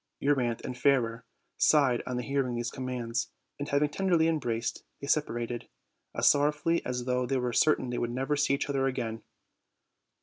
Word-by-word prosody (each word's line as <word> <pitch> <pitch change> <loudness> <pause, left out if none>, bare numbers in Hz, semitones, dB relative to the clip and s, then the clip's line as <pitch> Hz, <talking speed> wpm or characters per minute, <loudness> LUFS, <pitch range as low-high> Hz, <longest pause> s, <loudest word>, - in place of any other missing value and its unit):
Euryanthe 130 -5 0
and 125 - -4
Fairer 115 -4 +1 0.3
sighed 135 -6 +4
on 125 - -2
hearing 130 0 -1
these 120 0 -2
commands, 125 -2 -3 0.3
and, 145 - -4
hav 140 +1 +2
ing 150 - +1
tenderly 170 -1 +2
embraced, 120 -8 -1 0.2
they - - -6
separated, 120 -5 -1 0.5
as - - +2
sorrowfully 150 +3 +3
as 125 -1 -3
though 125 0 0
they 135 +1 0
were 125 -1 -1
certain 140 -4 +3
they 120 - -2
should 120 - -1
never 135 +4 -1
see 145 -1 +2
each 140 - -3
other 135 -1 +1
again. 115 -4 -3
130 Hz, 170 wpm, -29 LUFS, 120-145 Hz, 0.5 s, sighed